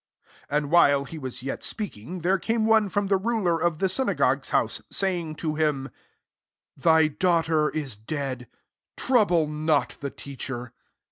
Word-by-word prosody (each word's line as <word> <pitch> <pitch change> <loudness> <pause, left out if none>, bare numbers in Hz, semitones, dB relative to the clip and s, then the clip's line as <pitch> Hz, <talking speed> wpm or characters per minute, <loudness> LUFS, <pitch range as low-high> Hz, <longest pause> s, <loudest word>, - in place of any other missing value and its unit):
49 145 - +1
And 145 0 -2
while 145 -5 +5
he 160 +3 -8
was 130 -2 -6
yet 135 - -4
speaking, 180 - -5
there 185 +3 +2
came 225 +3 0
one 220 -2 +4
from 205 +1 0
the 195 0 +2
ruler 190 -5 0
of 170 -2 +1
the 190 - +1
synagogue's 260 +8 0
Ao««f, - - +1
saying 175 -5 -1
to 155 0 -2
him, 150 -3 -1 0.9
'"^ - - -18
Thy 160 0 +5
daughter 160 -1 +1
is 140 -8 -3
dead: 130 +1 -4 0.5
trouble 205 -11 +3
not 150 0 0
the 140 - -4
Teacher. 130 -3 -7
160 Hz, 155 wpm, -25 LUFS, 140-185 Hz, 0.9 s, while